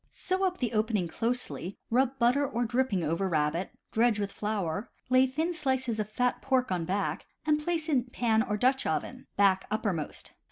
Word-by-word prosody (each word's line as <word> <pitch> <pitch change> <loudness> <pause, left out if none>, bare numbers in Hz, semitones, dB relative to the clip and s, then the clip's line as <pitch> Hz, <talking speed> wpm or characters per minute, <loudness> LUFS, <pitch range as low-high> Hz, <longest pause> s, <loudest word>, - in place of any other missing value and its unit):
Sew 375 +1 -2
up 365 -1 +1
the 245 -3 -2
opening 215 -4 +1
closely; 230 -2 -2
rub 260 +2 +2
butter 250 +4 +3
or 240 -3 -1
dripping 235 -6 +1
over 165 +5 0
rabbit, 155 +2 0 0.2
dredge 230 -1 +3
with 200 -1 -2
flour, 205 -2 -2 0.2
lay 255 +1 +6
thin 315 +7 -1
slices 260 -7 -1
of 210 -1 -2
fat 250 +3 0
pork 260 -4 +1
on 175 -3 0
back, 195 +4 -2 0.2
and 300 -1 +2
place 330 -1 -1
it - - -1
in 255 -4 +3
pan 235 -3 +1
or 210 -3 -1
Dutch 260 +4 +2
oven, - - -3
back 190 -2 +4
uppermost. 205 -7 -2
235 Hz, 185 wpm, -29 LUFS, 200-260 Hz, 0.2 s, lay